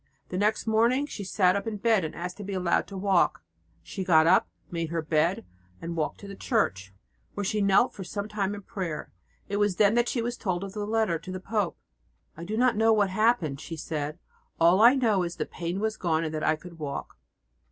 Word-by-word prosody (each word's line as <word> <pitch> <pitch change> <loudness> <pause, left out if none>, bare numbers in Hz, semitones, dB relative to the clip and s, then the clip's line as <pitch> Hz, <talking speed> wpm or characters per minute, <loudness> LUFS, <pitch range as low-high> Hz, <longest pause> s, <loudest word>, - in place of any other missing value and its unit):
The 180 - -3
next 210 +2 +1
morning 230 +5 +3
she 230 -8 -7
sat 185 -1 +2
up 200 +3 -2
in 215 -2 -3
bed 220 -2 +2
and 160 - -5
asked 180 +1 -5
to 210 - -7
be 200 0 -5
allowed 180 -2 +1
to - - -11
try - - -5
to 190 - -6
walk. 185 - +2 0.4
She 190 - -5
got 160 -3 +5
up, 175 +3 +4 0.2
made 165 -2 -2
her 165 -1 -2
bed 160 - +1 0.3
and 170 0 -5
walked 155 -2 -2
to 200 - -9
the 200 - -8
church, 100 - -1 0.4
where 205 - -2
she 210 +2 0
knelt 200 +5 +4
for 195 - -7
some 200 +3 -4
time 205 -1 -2
in 205 - -9
prayer. 180 -6 -5 0.3
It 200 - -2
was 205 -2 +2
then 205 +2 +4
that 240 +1 +2
she 235 - -1
was 240 +1 -3
told 185 -2 -2
of 195 -1 -7
the 210 -1 -4
letter 215 -6 +1
to 185 - -9
the 185 - -4
pope. 200 -1 -2 0.6
"I 165 - -8
did 215 +4 -3
not 250 +1 +3
know 225 +1 +4
what 205 -3 +3
had 205 +3 -2
happened," 170 - +2
she 165 - -7
said, 150 0 -4 0.4
"all 170 +3 +5
that - - +5
I 250 +3 +8
knew 225 -7 +2
was 175 -1 -2
that - - -2
the - - -18
pain 175 +2 -3
was 220 +1 -1
gone 165 -2 0
and 160 -1 -3
that 155 - -3
I 155 - +3
could 170 +1 -13
walk." 140 -2 -6
190 Hz, 245 wpm, -27 LUFS, 170-215 Hz, 0.6 s, I